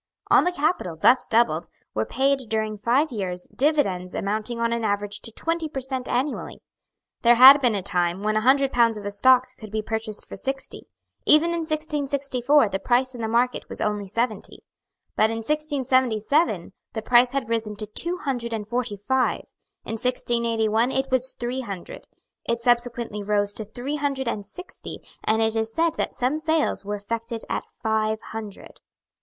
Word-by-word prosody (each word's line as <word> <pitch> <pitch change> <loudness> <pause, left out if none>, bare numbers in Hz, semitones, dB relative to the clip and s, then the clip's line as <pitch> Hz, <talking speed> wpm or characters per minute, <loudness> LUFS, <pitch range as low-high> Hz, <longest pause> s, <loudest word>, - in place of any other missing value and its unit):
On - - +6
the 360 - +2
capital, 300 - -1
thus 245 +10 +4
doubled, 200 -8 +2 0.3
were 110 0 -1
paid, 270 -1 0
during 220 -1 -1
five 250 +8 +1
years, 185 -5 -4
dividends 200 - 0
amounting 215 +4 -2
on 230 0 +1
an 235 -1 -2
average 205 -1 -1
to 230 - -3
twenty 330 +6 -2
per 275 - -4
cent. 260 -1 -4
annually. 265 +4 -2 0.6
There 240 0 +6
had 265 +4 +10
been 240 -5 +2
a 195 - -2
time 180 -1 -1
when 215 0 +1
a 215 - +2
hundred 270 +3 +3
pounds 230 -2 +3
of 210 - -8
the 205 - -4
stock 255 +5 +5
could 215 - -9
be 215 +1 -3
purchased 220 -1 -4
for - - -8
sixty. 270 0 -5 0.4
Even 310 +3 +7
in 340 - -1
1664 285 -5 +1
the 195 - -2
price 255 +3 +1
in 240 - -7
the 220 - -1
market 240 +3 0
was - - -8
only 210 -1 -1
seventy. 220 +1 -3 0.5
But 215 - +3
in 225 - -3
1677 260 - +1 0.2
the 220 - -3
price 245 +2 +4
had 275 -5 -1
risen 225 -2 -2
to 215 +1 -5
two 340 - -3
hundred 245 -4 -2
and 210 -2 -4
forty 235 -3 -2
five; 255 +6 0 0.4
in 225 - -4
1681 235 -2 +1
it 265 0 -1
was 260 0 +1
three 245 +2 -2
hundred; 195 -7 -8 0.4
it 235 0 -1
subsequently 235 -2 0
rose 205 0 +1
to 220 - -4
three 255 +7 -4
hundred 275 -3 -2
and 205 -4 -3
sixty; 360 - -9 0.2
and 220 +1 +2
it 220 0 +1
is 220 0 -1
said 330 +6 +1
that - - -2
some 260 +5 0
sales 315 -5 0
were 205 +1 -3
effected 230 +3 -5
at - - -3
five 220 0 +1
hundred. 215 -3 -8
235 Hz, 180 wpm, -24 LUFS, 215-265 Hz, 0.6 s, had